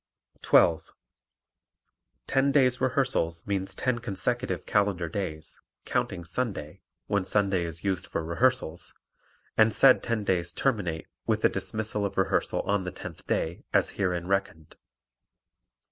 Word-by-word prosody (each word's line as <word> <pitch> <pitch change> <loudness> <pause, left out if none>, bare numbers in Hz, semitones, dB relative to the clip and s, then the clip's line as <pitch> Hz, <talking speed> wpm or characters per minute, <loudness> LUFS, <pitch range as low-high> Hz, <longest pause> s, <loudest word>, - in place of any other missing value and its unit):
12. 80 -1 +3 1.3
Ten 135 +1 +2
days' 130 -3 +3
rehearsals 130 - +1
means 95 -1 -1
ten 125 -2 0
consecutive 120 +3 -2
calendar 100 -4 +1
days, 80 -3 -5 0.2
counting 85 -2 -2
Sunday 90 -5 -3 0.2
(when 100 -2 0
Sunday 95 -2 +1
is 85 0 -6
used 95 -4 -1
for 85 - -3
rehearsals) 85 -2 0 0.6
and 110 0 +4
said 135 -2 +7
ten 115 -3 -1
days 90 -3 0
terminate 95 -12 -1 0.2
with 110 -1 +1
the - - +5
dismissal 105 +2 -2
of 100 - -3
rehearsal 95 - +1
on 100 -1 0
the 90 - -4
tenth - - -10
day, 80 +2 -1
as - - +3
herein 90 -3 -1
reckoned. 95 -5 -2
100 Hz, 130 wpm, -27 LUFS, 85-115 Hz, 1.3 s, said